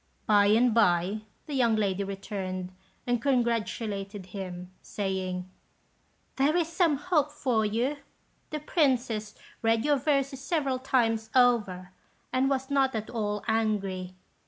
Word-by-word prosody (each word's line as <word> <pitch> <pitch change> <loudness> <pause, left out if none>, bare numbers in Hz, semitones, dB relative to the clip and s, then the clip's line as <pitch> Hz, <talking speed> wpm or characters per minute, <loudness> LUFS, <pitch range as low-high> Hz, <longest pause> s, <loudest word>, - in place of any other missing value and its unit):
By 205 -1 +5
and 230 +3 +4
by, 200 -1 +2 0.2
the 295 - -6
young 240 -4 +3
lady 200 -2 0
returned 195 -2 -5 0.3
and 245 -2 0
congratulated 225 -6 -1
him, 180 -2 -7
saying, 185 -2 -3 0.9
"There 290 +5 +3
is 335 -2 +1
some 335 -4 +2
hope 300 -2 +1
for 255 -7 0
you. 240 +7 0 0.5
The 305 -1 -4
Princess 245 - 0 0.3
read 225 +1 +2
your 295 -1 +3
verses 275 -1 0
several 280 -3 0
times 225 -4 +1
over, 210 -8 +3 0.4
and 260 +1 +2
was 265 0 -1
not 270 -3 +2
at 220 -1 -4
all 210 -3 -2
angry. 200 -5 -1
225 Hz, 130 wpm, -28 LUFS, 200-270 Hz, 0.9 s, By